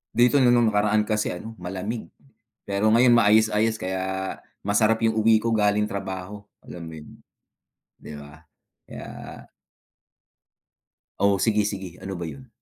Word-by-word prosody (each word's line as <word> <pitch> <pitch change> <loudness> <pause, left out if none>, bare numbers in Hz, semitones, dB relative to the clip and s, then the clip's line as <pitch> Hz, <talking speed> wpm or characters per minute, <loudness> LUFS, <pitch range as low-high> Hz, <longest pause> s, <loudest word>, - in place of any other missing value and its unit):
Dito 125 +3 +4
'no 120 - +5
nung 120 -2 +4
nakaraan 105 0 +1
kasi 105 -1 0
ano 110 +6 -8
malamig, 95 +5 -6 0.6
pero 100 +2 +1
ngayon 120 +1 +5
maayos-ayos 110 0 +3
kaya 95 0 -3 0.6
masarap 110 +2 +2
yung 110 - 0
uwi 110 0 +4
ko 115 0 0
galing 105 0 +2
trabaho, 100 0 -6 0.2
alam 85 -1 -9
mo - - -9
yun, 75 - -14 0.8
'di 75 - -11
ba, 75 +3 -15 0.4
kaya - - -9 2.1
Oh, 100 0 +3
sige 105 +1 +1
sige. 95 -3 -6
Ano 95 0 -5
ba 85 - -5
yun? 70 -4 -9
105 Hz, 140 wpm, -24 LUFS, 95-110 Hz, 2.1 s, no